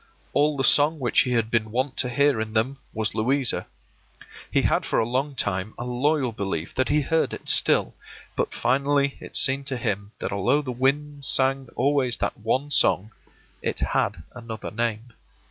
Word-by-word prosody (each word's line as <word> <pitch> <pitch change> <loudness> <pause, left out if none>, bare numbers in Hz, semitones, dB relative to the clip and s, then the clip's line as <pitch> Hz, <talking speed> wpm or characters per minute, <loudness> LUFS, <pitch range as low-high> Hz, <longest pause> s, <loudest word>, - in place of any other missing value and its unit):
All 150 0 +2
the 135 - 0
song 150 +4 +4
which 125 -5 +1
he 125 - +2
had 115 -1 0
been 115 -2 0
wont 130 +4 -2
to 125 - +3
hear 140 -1 +2
in 110 0 -5
them 125 +5 0
was 110 -1 -2
Louisa; 130 +3 +1 0.8
he - - +1
had - - +1
for - - -1
a - - +2
long 135 +4 -2
time 100 -2 -2
a 120 - -5
loyal 130 +1 0
belief 95 -5 -4
that 130 0 0
he 150 +1 +3
heard 160 +3 0
it - - -13
still, - - +4 0.4
but - - -1
finally 140 +3 +1
it - - -5
seemed 135 0 +2
to 135 -2 0
him 100 -3 -3
that - - -4
although 120 +10 +1
the 130 - -4
winds 140 +3 -1
sang 135 -1 +1
always 135 -2 +2
that - - -2
one 130 +6 -2
song, 105 -5 +3 0.5
it - - -2
had 80 - -1
another 115 -3 -7
name. 115 +1 -3
125 Hz, 180 wpm, -24 LUFS, 110-140 Hz, 0.8 s, song